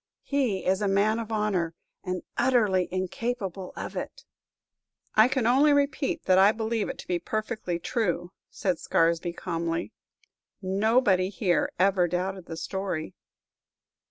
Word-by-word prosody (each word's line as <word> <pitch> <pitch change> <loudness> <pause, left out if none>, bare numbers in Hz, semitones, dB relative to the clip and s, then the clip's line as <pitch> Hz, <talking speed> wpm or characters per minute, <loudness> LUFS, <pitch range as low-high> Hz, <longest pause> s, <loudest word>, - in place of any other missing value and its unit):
He 260 -9 0
is 190 +2 +2
a 205 - +1
man 205 +3 +2
of 225 -1 -6
honor, 195 -6 0 0.3
and 185 -1 -3
utterly 210 -8 +2
incapable 190 0 -3
of - - -6
it." - - -6 0.9
"I 215 +2 +6
can 260 -2 0
only 275 +5 +5
repeat 280 -1 0
that 185 0 +4
I 195 +2 +7
believe 220 -1 -2
it - - -5
to - - -10
be 175 -1 0
perfectly 215 -2 -3
true!" 175 -3 -2 0.2
said 185 -5 -1
Scaresby, 165 +1 +1
calmly. 165 -1 -3 0.7
"Nobody 195 -1 +2
here 180 -2 0
ever 185 -1 +3
doubted 185 +1 -3
the 165 - -6
story." 190 -4 -3
195 Hz, 135 wpm, -27 LUFS, 180-220 Hz, 0.9 s, I